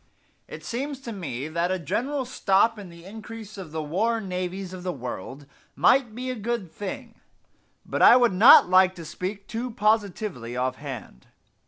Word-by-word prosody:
It - - -10
seems 270 +3 -4
to 235 - -7
me 145 - -5
that 170 +2 -1
a 185 - 0
general 260 - -2
stop 220 -2 +2
in 195 -3 -9
the 170 0 -14
increase 220 +1 -9
of 185 -6 -9
the 160 0 -3
war 215 +10 0
navies 185 -1 -4
of 185 - -8
the 180 0 -3
world 130 - -7 0.3
might 245 -5 +3
be 255 +1 -4
a - - -4
good 220 -5 -3
thing; 225 +5 -7 0.6
but - - -3
I 245 - +9
would 240 -5 +3
not 210 +4 +8
like 185 0 +4
to 170 - -9
speak 195 +5 -6
too 235 +3 -4
positively 205 - -1
offhand. 130 - -5
195 Hz, 170 wpm, -25 LUFS, 170-230 Hz, 0.6 s, I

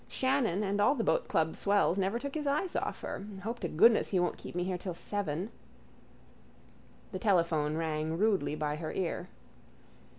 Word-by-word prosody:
Shannon 260 -7 +1
and 205 0 0
all 240 +7 +4
the 230 - -1
boatclub 160 -6 +1
swells 200 -2 +2
never 195 +4 +1
took 280 +3 -5
his 300 -2 -2
eyes 305 +6 0
off - - -2
her. - - -5 0.2
Hope 230 +3 -3
to 175 - -2
goodness 220 +9 +5
he 190 - +2
won't 175 - +1
keep - - -8
me 180 - 0
here 185 0 -1
till 180 -1 -4
seven. 195 +1 -3 1.6
The 185 - -4
telephone 165 -6 +2
rang 160 0 -1
rudely 195 -7 +2
by 150 -1 -2
her 155 0 -4
ear. 180 0 -3
190 Hz, 170 wpm, -31 LUFS, 165-220 Hz, 1.6 s, goodness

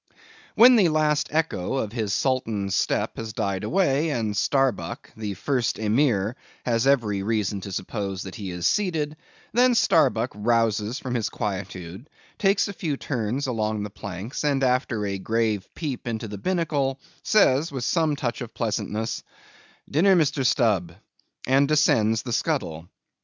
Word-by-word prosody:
When 240 +3 +8
the 190 -6 +5
last 155 -1 +2
echo 150 - -1
of 110 -6 -2
his 110 -3 -2
sultan's 110 -6 0
step - - 0
has 110 -1 -5
died 100 -3 -2
away, 165 -4 +1
and 110 -7 -1
Starbuck, 135 +4 0
the 105 -3 -4
first 125 +3 -1
Emir, 110 -1 +1 0.3
has 120 +1 +1
every 110 -8 +2
reason 105 -2 -1
to 100 - -7
suppose 95 0 -4
that 95 - -8
he 100 -5 -6
is 90 -1 -4
seated, 155 - 0 0.4
then 245 +1 +4
Starbuck 125 - +3
rouses 110 +1 +1
from 130 -2 -5
his 115 -4 -1
quietude, 95 - -5 0.3
takes 195 0 +3
a 200 - -5
few 155 -6 -3
turns 125 +1 -2
along 110 -4 -1
the 105 - -6
planks, 100 - -6
and, 140 -2 +1
after 125 -4 +1
a 100 -1 -3
grave 110 -1 -1
peep 140 -7 -4
into 115 -1 -3
the 105 -1 -7
binnacle, 150 - 0 0.2
says, 165 -7 +3
with 130 -3 -4
some 160 +1 +1
touch 125 -2 -3
of 120 -2 -7
pleasantness, 110 0 -2 0.7
"Dinner, 185 +7 +4
Mr. 150 -4 +2
Stubb," 105 - +2 0.5
and 135 +2 +4
descends 115 -7 +3
the 120 - -4
scuttle. 90 - -2
120 Hz, 150 wpm, -25 LUFS, 105-145 Hz, 0.7 s, When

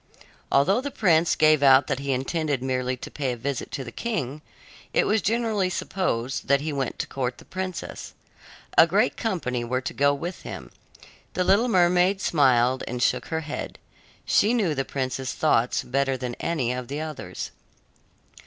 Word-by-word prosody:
Although 190 - +3
the 285 - -4
prince 170 - +3
gave 155 -1 +4
out 135 -1 +6
that 130 - -2
he 140 0 -2
intended 135 +1 -1
merely 130 -1 -1
to - - -9
pay 135 -4 -2
a - - -7
visit 135 +2 -3
to 135 - -3
the 120 - -8
king, 150 - -3 0.5
it - - +4
was 215 0 +2
generally 220 -2 0
supposed 135 -10 -2
that 140 0 +4
he 150 +1 -3
went 135 -2 -2
to - - -2
court 125 -2 -3
the - - -15
princess. 185 -1 -6 0.6
A - - +9
great - - +2
company 145 - -2
were 130 +2 -1
to 135 - -5
go 140 +1 +3
with 170 +6 -5
him. - - -8 0.6
The 180 - +1
little 200 +7 +4
mermaid 180 -1 +3
smiled 130 -7 +3
and 125 +1 -2
shook - - +1
her 160 0 -2
head. 155 -1 -6 0.5
She 220 +4 +3
knew 195 -10 +1
the 135 -2 -1
prince's 130 -1 -3
thoughts 125 -6 +1
better 135 +1 0
than 125 -1 -4
any 140 -8 -1
of 125 -1 -5
the 140 +3 -4
others. 150 - -6
140 Hz, 175 wpm, -25 LUFS, 130-180 Hz, 0.6 s, A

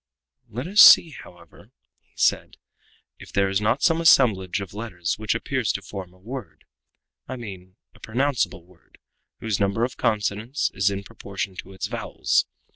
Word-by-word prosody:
"Let 125 +6 -5
us 205 +5 +5
see, 165 - +9
however," 85 - -15 0.3
he - - -40
said, - - 0 0.6
"if - - -13
there 100 -1 +1
is 95 +1 0
not 110 +6 0
some 165 0 +3
assemblage 105 - +4
of 100 -2 -8
letters 95 -5 -4
which 110 +1 -1
appears 120 -2 -1
to 100 - -5
form 95 -3 -8
a 95 - -22
word 125 +8 -9 0.6
I 130 - -5
mean 95 -6 -10 0.2
a - - -20
pronounceable 125 -6 -1
word, 90 -1 -24 0.4
whose 110 -4 -2
number 100 +3 0
of 125 - -3
consonants 110 +3 -1
is 100 0 +2
in 100 0 -4
proportion 100 -2 -6
to 95 - -9
its 95 - -4
vowels. - - -1
105 Hz, 165 wpm, -24 LUFS, 95-120 Hz, 0.6 s, see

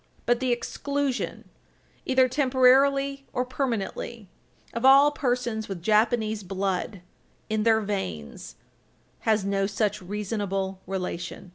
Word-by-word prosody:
But 240 0 +2
the 260 -1 0
exclusion, 280 +2 -2 0.6
either 260 0 +4
temporarily 275 +1 +3
or 250 - 0
permanently, 235 -4 -3 0.4
of 230 - -4
all 275 +2 +7
persons 245 -6 -2
with 180 -4 -6
Japanese 220 +1 +2
blood 195 0 -3 0.5
in 215 0 +1
their 220 0 +3
veins 90 - -5 0.7
has 215 -3 +2
no 195 0 +1
such 210 0 -1
reasonable 195 -1 -3
relation. 180 -1 -5
220 Hz, 110 wpm, -26 LUFS, 195-255 Hz, 0.7 s, all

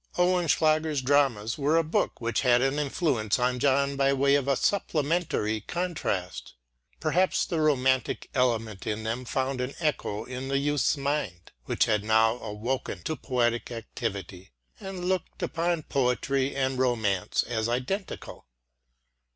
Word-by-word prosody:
Oehlenschläger's 160 -4 +2
dramas 130 -4 +2
were 145 +3 +3
a 165 - +3
book 155 - -1
which 115 -1 -1
had 125 -1 +4
an 135 +2 +1
influence 140 - 0
on 125 0 0
John 140 +1 +2
by 135 0 +3
way 140 +1 +3
of 140 -1 +2
a 140 - +3
supplementary 150 - 0
contrast. 160 - -3 0.4
Perhaps 175 +4 +2
the 165 -3 -1
romantic 130 -4 +1
element 115 -6 0
in 110 0 -2
them 115 +3 -3
found 130 +1 -1
an 125 +2 -4
echo 140 -9 -1
in 130 +1 -6
the 135 0 +1
youth's 145 +1 +1
mind, 140 - -3
which - - +2
had 105 -2 +1
now 110 +1 +3
awoken* 105 -4 -4
to 155 - -2
poetic 120 -4 0
activity, 100 -5 -5 0.3
and 190 -2 -6
looked 185 -2 -2
upon 170 -1 -1
poetry 135 +1 0
and 130 -1 0
romance 110 -7 +1
as 115 -1 -2
identical. 130 - -4
130 Hz, 140 wpm, -27 LUFS, 115-150 Hz, 0.4 s, had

